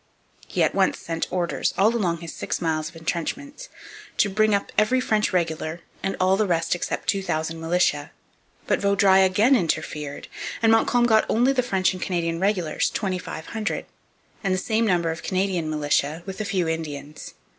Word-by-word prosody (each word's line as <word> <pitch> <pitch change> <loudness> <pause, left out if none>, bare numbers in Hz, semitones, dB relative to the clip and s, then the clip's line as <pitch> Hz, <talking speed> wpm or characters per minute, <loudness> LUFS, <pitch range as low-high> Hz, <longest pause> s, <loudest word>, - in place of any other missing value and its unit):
He - - +1
at - - +2
once - - +2
sent 165 -1 -4
orders, 175 -2 -1
all 215 +4 +4
along 175 -7 0
his 165 -2 -7
six - - -3
miles 160 -2 -1
of 165 - -19
entrenchments, 175 - -4 0.5
to 205 - +3
bring 215 +1 +3
up 200 - -3
every 215 +5 +3
French 215 -4 +1
regular 165 -2 -1 0.2
and 195 - -2
all 185 +1 +4
the 215 0 +1
rest 165 -2 +1
except 175 - -3
2,000 165 -4 -1
militia. 165 -3 +1 0.6
But - - +1
Vaudreuil 195 -1 +5
again 205 +8 +4
interfered; 155 - -2 0.4
and 225 - +6
Montcalm 240 +2 +4
got 220 -2 +4
only 245 +4 +3
the 260 - +2
French 190 -6 +1
and 185 - -8
Canadian 170 -2 -1
regulars, 190 -4 +1
2,500, 190 +1 -3 0.6
and 190 -2 +1
the - - -1
same 220 +4 +1
number 170 -4 +2
of 160 - -6
Canadian 185 -4 -1
militia 150 +1 0
with 195 +2 -5
a - - -2
few 185 -4 0
Indians. 155 -2 -5
185 Hz, 170 wpm, -24 LUFS, 165-210 Hz, 0.6 s, and